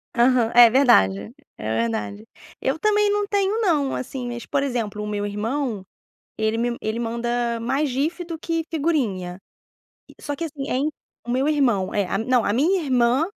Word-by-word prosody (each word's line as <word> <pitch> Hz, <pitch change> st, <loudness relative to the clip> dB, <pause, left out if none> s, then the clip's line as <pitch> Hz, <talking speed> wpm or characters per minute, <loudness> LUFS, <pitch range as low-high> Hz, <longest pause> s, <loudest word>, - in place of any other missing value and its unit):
Aham. 240 Hz, -1 st, +3 dB
É 240 Hz, -1 st, +9 dB
verdade, 100 Hz, -, +3 dB, 0.2 s
é 110 Hz, +1 st, -2 dB
verdade. 105 Hz, -2 st, -3 dB, 0.3 s
Eu, 265 Hz, +3 st, 0 dB
também, 420 Hz, +3 st, +2 dB
não 415 Hz, 0 st, +1 dB
tenho 400 Hz, +2 st, +1 dB
não, 300 Hz, -9 st, +1 dB
assim, 255 Hz, -1 st, -5 dB
mas, 240 Hz, -1 st, -6 dB
por 280 Hz, -, 0 dB
exemplo, 230 Hz, -6 st, -2 dB
o -, -, -4 dB
meu 205 Hz, -1 st, -2 dB
irmão, 220 Hz, +1 st, -2 dB, 0.5 s
ele 220 Hz, +1 st, 0 dB
me 240 Hz, 0 st, -1 dB
ele 220 Hz, +1 st, -3 dB
manda 235 Hz, 0 st, -1 dB
mais 270 Hz, +6 st, 0 dB
GIF 300 Hz, +7 st, -2 dB
do 335 Hz, -1 st, -6 dB
que 330 Hz, 0 st, -2 dB
figurinha. 230 Hz, -, -1 dB, 0.8 s
Só 290 Hz, -, -4 dB
que, 330 Hz, -, -4 dB
assim, 290 Hz, -4 st, -6 dB
é -, -, +1 dB
in 280 Hz, +4 st, +1 dB, 0.4 s
O -, -, -4 dB
meu 260 Hz, +3 st, +1 dB
irmão 245 Hz, -11 st, +1 dB
é, 200 Hz, -2 st, +1 dB
a -, -, -1 dB
não, 245 Hz, +1 st, +2 dB
a -, -, +1 dB
minha 330 Hz, -, +2 dB
irmã 255 Hz, +1 st, +2 dB
245 Hz, 180 wpm, -23 LUFS, 220-295 Hz, 0.8 s, É